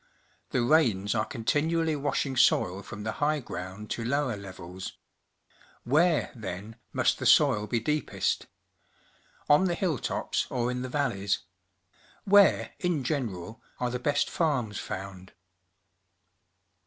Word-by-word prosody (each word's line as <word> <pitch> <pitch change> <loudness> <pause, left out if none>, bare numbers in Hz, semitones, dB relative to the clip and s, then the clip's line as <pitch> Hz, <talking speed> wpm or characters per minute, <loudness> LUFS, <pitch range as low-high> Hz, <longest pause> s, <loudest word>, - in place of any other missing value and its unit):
The 125 - +1
rains 115 -8 +3
are 110 -2 +1
continually 160 +7 0
washing 140 -1 -1
soil 100 -6 +3
from 100 +1 -8
the 110 - -2
high 150 +1 +2
ground 95 -3 -7
to 115 - -2
lower 135 0 0
levels. 95 -2 -8 0.9
AMiere, 155 +5 +3
then, 105 0 -7
must - - +1
the - - 0
soil 105 0 +5
be 115 +2 0
deepest? 150 +5 -1 1.0
On 150 +6 +5
the 175 -2 +1
hilltops 170 - -1
or 125 0 -1
in 125 0 -3
the 130 - -4
valleys? 115 -8 0 0.9
'VMiere, 200 0 +5
in 175 -6 0
general, 115 - -3 0.2
are 125 -1 -1
the 125 - -2
best 145 +3 +1
farms 130 - 0
found? 95 -1 -7
125 Hz, 125 wpm, -28 LUFS, 105-150 Hz, 1.0 s, soil